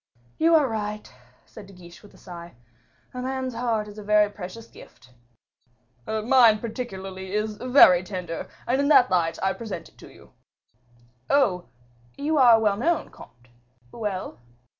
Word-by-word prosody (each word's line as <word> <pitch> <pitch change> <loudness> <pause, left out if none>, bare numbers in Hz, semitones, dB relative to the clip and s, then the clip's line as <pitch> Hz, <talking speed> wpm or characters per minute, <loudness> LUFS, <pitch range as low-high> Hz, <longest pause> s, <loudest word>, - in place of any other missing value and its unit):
"You 330 +1 +4
are 300 -4 +4
right," 210 - -5 0.3
said 200 - -13
De 195 - -15
Guiche 175 -1 -15
with 205 - -18
a - - -18
sigh; 170 -3 -11 0.6
"a 250 - -5
man's 260 0 -4
heart 230 -3 -2
is 210 0 -11
a - - -9
very 210 0 +3
precious 205 +3 -9
gift." 125 - -18 0.9
"Mine 225 0 +4
particularly 195 -5 -7
is 210 0 -2
very 250 -9 +6
tender, 180 -3 -6 0.2
and 260 +3 +1
in 280 - 0
that 255 -4 +5
light 165 -2 +1
I 190 0 +1
present 195 -7 -8
it - - -28
to - - -13
you." - - -19 1.0
"Oh! 200 -11 +1 0.5
you 300 +2 -1
are 240 -4 +7
well 210 -2 +1
known, 330 +9 -1
comte. 120 +1 -17 0.4
Well?" 205 - -5
210 Hz, 155 wpm, -24 LUFS, 185-245 Hz, 1.0 s, are